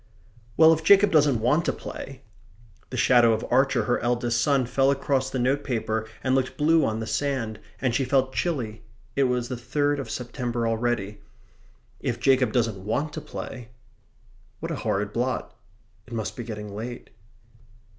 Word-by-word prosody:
"Well, 160 0 +8
if 160 0 -3
Jacob 200 +4 +6
doesn't 145 -7 +4
want 145 +8 +3
to - - +2
play" 135 0 -8 0.7
(the - - -5
shadow 120 -2 +5
of 110 - -2
Archer, 135 +2 +3
her 120 - +1
eldest 120 -1 0
son, 135 -1 +2
fell 135 +3 +2
across 135 -1 0
the 130 - -3
notepaper 120 -4 -1 0.2
and 130 - +1
looked 130 -1 0
blue 160 +1 +4
on 110 -3 0
the 110 - -3
sand, 125 -4 -2 0.2
and 130 -3 0
she 135 - +1
felt 130 0 +1
chilly 120 - -2 0.3
it 140 - +3
was 125 -1 0
the 125 - -4
third 145 +4 0
of 135 - -5
September 120 -1 -3
already), 115 -3 -1 0.8
"if - - -2
Jacob 130 -4 +3
doesn't 110 -6 0
want 140 +9 -2
to 155 - -5
play" 125 -5 -8 0.9
what - - -4
a - - -2
horrid 100 +1 -1
blot! 125 +2 -2 0.5
It 120 - -11
must 110 -2 -3
be 120 - -5
getting 105 -3 -7
late. 120 +4 -7
125 Hz, 165 wpm, -25 LUFS, 115-140 Hz, 0.9 s, Well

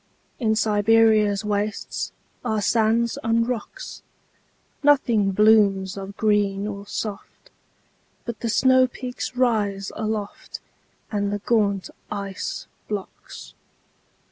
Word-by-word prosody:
In 220 -3 +2
Siberia's 215 -1 +3
wastesAre 210 +1 -3
sands 230 +1 +2
and 230 +1 +2
rocks. 245 -4 -5 0.8
Nothing 250 -8 +3
blooms 200 -2 +4
of 195 0 -8
green 205 -2 +1
or 200 -1 -6
soft, 205 -1 -6 0.7
But 235 -3 -5
the 230 - -2
snowpeaks 255 0 +1
rise 205 -6 +1
aloftAnd 210 -1 -5
the 205 0 -2
gaunt 200 -4 +1 0.2
ice 200 -2 -4 0.2
blocks. 205 -2 -7
215 Hz, 90 wpm, -23 LUFS, 200-225 Hz, 0.8 s, blooms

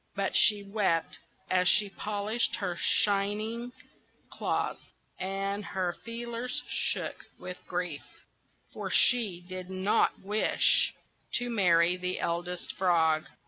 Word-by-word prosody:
But 200 -1 -2
she 210 -2 +6
wept 195 -5 -1 0.3
as 185 -1 +2
she 210 +1 +5
polished 210 +3 -1
her 180 -4 -3
shining 210 +6 +1 0.6
claws, - - -2 0.4
and 195 +2 -3
her 185 -2 -2
feelers 235 +2 -5
shook - - -1
with 180 0 -8
grief; 175 -5 -3 0.7
for - - -5
she 215 -8 +4
did 185 0 -7
not 190 +2 +1
wish 210 +3 +2 0.4
to 245 -1 0
marry 175 -4 +3
the 180 0 -3
Eldest 175 +1 -3
Frog. 160 -4 +2
195 Hz, 110 wpm, -29 LUFS, 180-215 Hz, 0.7 s, she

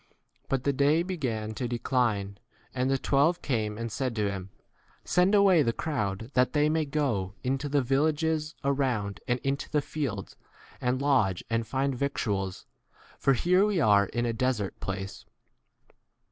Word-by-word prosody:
12 - - -37
But 135 -2 0
the 140 - +1
day 145 +5 +3
began 125 - -3
to 125 +2 -3
decline, 115 -5 -1 0.3
and 130 0 0
the 135 - +2
twelve 145 +6 +2
came 110 -5 -1
and 115 0 -4
said 130 0 -2
to 105 -2 0
him, 95 -1 -6 0.5
Send 180 +3 +3
away 195 -5 +6
the 115 -5 +1
crowd 115 - -3
that 125 0 +2
they 150 0 +3
may 155 0 +1
go 125 -10 -1
k 125 - -1
into 135 +2 -1
the 140 -1 +2
villages 155 +3 0
around 130 -8 0
and 125 0 +1
into 135 +1 -2
the 150 - +2
fields, 125 -12 -4 0.5
and 125 +1 0
lodge 110 -10 +2
and 115 0 0
find 135 +3 0
victuals, 105 -8 -2 0.5
for 135 - +3
here 180 - +3
we 205 -3 +1
are 100 -7 +4
in 120 +3 -2
a - - 0
13 115 - -3
desert 120 -6 -1
place. 95 0 -5
130 Hz, 170 wpm, -28 LUFS, 110-145 Hz, 0.5 s, away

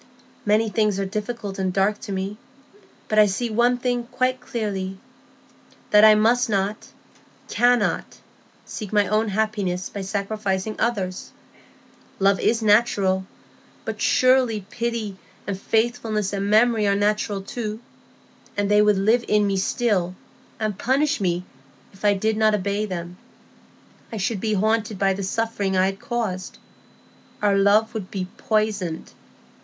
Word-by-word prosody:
Many 215 +2 +3
things 210 -2 +1
are 195 - -1
difficult 210 0 -5
and 190 -1 0
dark 200 +3 +1
to - - -7
me; 195 +2 -3 0.7
but 215 - +2
I 210 - +7
see 225 +4 -2
one 240 +3 +3
thing 245 -1 -1
quite 255 +1 -1
clearly,—that 200 0 -3
I 215 0 +9
must 230 +3 +3
not, 200 +1 -1 0.6
cannot, 245 0 +1 0.5
seek 210 -4 -7
my 205 -1 +3
own 215 +2 +1
happiness 200 -3 -1
by 200 - -6
sacrificing 200 0 -2
others. 195 -6 -2 0.8
Love 195 0 +3
is 225 0 +1
natural; 200 -3 +3 0.6
but - - -5
surely 255 -6 +3
pity 230 -4 -3 0.3
and 200 - -2
faithfulness 220 -3 0
and 200 0 -2
memory 220 0 +4
are 200 - +3
natural 205 -1 0
too. 215 0 -5 0.8
And 205 0 0
they 210 0 +6
would 210 -1 +4
live 220 +5 +3
in 210 -1 +3
me 200 -1 0
still, 190 -3 0 0.4
and 215 -3 -2
punish 275 0 +1
me 180 -1 0 0.5
if 195 - -18
I 205 -1 +4
did 215 +2 0
not 215 -1 +4
obey 205 +2 -1
them. 175 -1 -6 0.9
I 225 - -5
should 205 +1 -1
be 215 -1 0
haunted 215 +1 0
by 195 0 +2
the 195 - -5
suffering 200 -1 -1
I 185 - +4
had 195 0 -2
caused. 210 -6 -4 0.8
Our 205 -1 +2
love 200 +3 +3
would 205 -4 -5
be 190 -3 -3
poisoned. 210 -6 -1
210 Hz, 140 wpm, -23 LUFS, 195-225 Hz, 0.9 s, I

